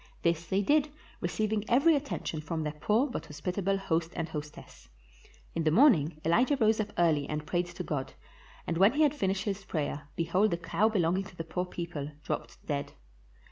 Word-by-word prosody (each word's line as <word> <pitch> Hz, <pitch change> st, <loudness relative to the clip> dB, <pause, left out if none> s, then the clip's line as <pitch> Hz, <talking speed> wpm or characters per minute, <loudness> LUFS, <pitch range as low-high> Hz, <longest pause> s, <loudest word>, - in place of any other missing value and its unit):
This 170 Hz, -1 st, +1 dB
they 195 Hz, +3 st, +1 dB
did, 295 Hz, +6 st, +3 dB, 0.3 s
receiving 210 Hz, +4 st, -1 dB
every 280 Hz, +7 st, +5 dB
attention 275 Hz, -, -3 dB
from 160 Hz, +1 st, -3 dB
their 150 Hz, -1 st, -3 dB
poor 210 Hz, -, +2 dB
but 265 Hz, -, -5 dB
hospitable 180 Hz, +6 st, -1 dB
host 165 Hz, -3 st, -1 dB
and 165 Hz, -, -2 dB
hostess. 150 Hz, -2 st, -9 dB, 0.6 s
In 165 Hz, -, -1 dB
the 155 Hz, -, +3 dB
morning 165 Hz, -, +4 dB
Elijah 240 Hz, -, +3 dB
rose 220 Hz, -2 st, +3 dB
up 210 Hz, -1 st, -1 dB
early 155 Hz, -5 st, +2 dB
and 150 Hz, 0 st, -3 dB
prayed 175 Hz, +2 st, 0 dB
to 175 Hz, +1 st, -6 dB
God, 145 Hz, -5 st, -3 dB, 0.5 s
and 165 Hz, 0 st, -2 dB
when 195 Hz, +5 st, +6 dB
he 305 Hz, +2 st, +3 dB
had 295 Hz, -, +4 dB
finished 195 Hz, -8 st, -1 dB
his 200 Hz, -2 st, -3 dB
prayer, 145 Hz, -4 st, -3 dB
behold 180 Hz, +6 st, +2 dB
the 170 Hz, -, -1 dB
cow 175 Hz, +5 st, +1 dB
belonging 185 Hz, -2 st, +1 dB
to 195 Hz, -, -13 dB
the 165 Hz, -, -4 dB
poor 180 Hz, +3 st, -2 dB
people 165 Hz, -5 st, -5 dB
dropped -, -, -5 dB
dead. 145 Hz, -2 st, -3 dB
175 Hz, 185 wpm, -30 LUFS, 160-210 Hz, 0.6 s, when